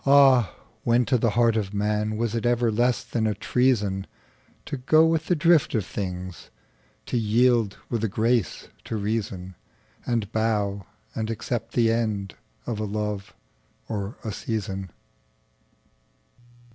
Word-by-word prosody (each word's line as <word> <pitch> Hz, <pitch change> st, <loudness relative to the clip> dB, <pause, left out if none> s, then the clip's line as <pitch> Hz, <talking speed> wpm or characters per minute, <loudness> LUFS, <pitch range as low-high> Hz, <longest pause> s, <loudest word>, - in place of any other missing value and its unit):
'Ah, 135 Hz, -6 st, +5 dB, 0.3 s
when 120 Hz, +1 st, +3 dB
to 125 Hz, -, +2 dB
the 115 Hz, -1 st, +2 dB
heart 115 Hz, -2 st, +4 dB
of 105 Hz, -3 st, -2 dB
manWas 105 Hz, +2 st, 0 dB
it 115 Hz, -, -1 dB
ever 120 Hz, -1 st, +2 dB
less 120 Hz, +3 st, +1 dB
than 110 Hz, -2 st, -1 dB
a 105 Hz, -, 0 dB
treasonTo 105 Hz, -5 st, +1 dB, 0.8 s
go 155 Hz, +1 st, +6 dB
with 160 Hz, -1 st, +1 dB
the 180 Hz, -, +3 dB
drift 165 Hz, -3 st, +3 dB
of 105 Hz, -5 st, 0 dB
things, 90 Hz, -3 st, -5 dB, 0.6 s
To -, -, -1 dB
yield 115 Hz, -1 st, +3 dB
with 115 Hz, -2 st, -2 dB
a -, -, +3 dB
grace 110 Hz, +1 st, 0 dB, 0.2 s
to 110 Hz, -, -3 dB
reason, 100 Hz, -3 st, -3 dB, 0.5 s
And 115 Hz, -4 st, -1 dB
bow 105 Hz, -4 st, 0 dB, 0.3 s
and 110 Hz, 0 st, -3 dB
accept 115 Hz, 0 st, -3 dB
the 115 Hz, -2 st, +4 dB
endOf 110 Hz, -5 st, -1 dB, 0.5 s
a -, -, -1 dB
love 105 Hz, -1 st, -3 dB, 0.5 s
or 100 Hz, +2 st, -4 dB
a 110 Hz, -, -3 dB
season? 100 Hz, -3 st, -4 dB
110 Hz, 135 wpm, -25 LUFS, 100-120 Hz, 0.8 s, go